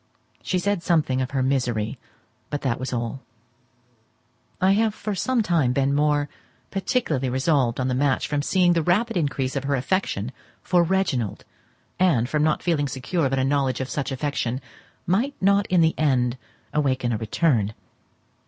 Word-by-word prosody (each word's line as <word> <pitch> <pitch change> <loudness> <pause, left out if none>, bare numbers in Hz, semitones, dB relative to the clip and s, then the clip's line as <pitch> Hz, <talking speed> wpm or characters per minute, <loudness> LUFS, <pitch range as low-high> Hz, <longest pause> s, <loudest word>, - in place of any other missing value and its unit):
She 185 - -1
said 200 0 0
something 155 -7 +1
of 130 - -2
her 135 -2 0
misery, 125 -5 -1 0.5
but 145 - -3
that 130 -4 0
was 130 - -4
all. 120 +2 -3 1.4
I 190 +1 +4
have 215 +1 +2
for 210 - -4
some 240 +4 +1
time 160 -10 +2
been 140 +1 +1
more 145 0 +2 0.4
particularly 180 - 0
resolved 130 -2 +1
on 130 - 0
the 130 - 0
match 135 +1 +1
from 145 -1 0
seeing 180 +2 +3
the 165 - +2
rapid 210 +8 +1
increase 140 -5 -1
of 140 0 -2
her 140 0 +1
affection 130 - -1 0.3
for 180 -1 +3
Reginald, 170 - 0 0.5
and 155 -11 +3
from 150 +3 0
not 155 0 +1
feeling 155 -5 +1
secure 140 +3 -1
that 135 - -1
a 130 - +2
knowledge 135 -2 +1
of 130 0 -4
such 140 -1 -2
affection 130 -3 -2 0.5
might 235 +11 +1
not 200 +1 +3
in 180 -2 +3
the 160 0 +4
end 125 -5 +2 0.4
awaken 130 -5 +1
a - - 0
return. 110 - +1
145 Hz, 165 wpm, -24 LUFS, 130-175 Hz, 1.4 s, I